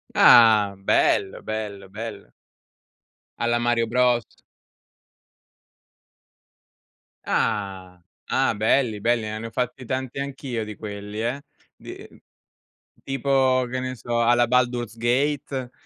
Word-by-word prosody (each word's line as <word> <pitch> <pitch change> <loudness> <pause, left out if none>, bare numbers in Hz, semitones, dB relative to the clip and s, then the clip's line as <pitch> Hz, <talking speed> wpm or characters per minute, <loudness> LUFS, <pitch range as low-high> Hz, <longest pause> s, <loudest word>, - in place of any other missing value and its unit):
Ah, 110 -4 +6
bello, 95 0 +1
bello, 105 -3 -5
bello. 110 +4 -8 1.1
Alla 120 0 +1
Mario 120 -1 +1
Bros. 125 -1 0 2.9
Ah, 95 -3 -2 0.3
ah, - - +2
belli, 110 0 +1
belli. 115 0 +1
Ah, 110 0 -5
ne 115 - -6
ho - - -8
fatti 125 +2 -3
tanti 130 +1 -4
anch'io 135 -4 -4
di 105 0 -8
quelli, 105 0 -7
eh? 130 +4 -2 0.3
Di - - -11
uhm, - - -20 0.8
tipo 135 -1 +1
che 130 +1 -3
ne 130 0 -4
so 120 0 -2
alla 120 0 +3
Baldur's 120 -2 0
Gate? 130 +1 -1
120 Hz, 110 wpm, -23 LUFS, 110-130 Hz, 2.9 s, Ah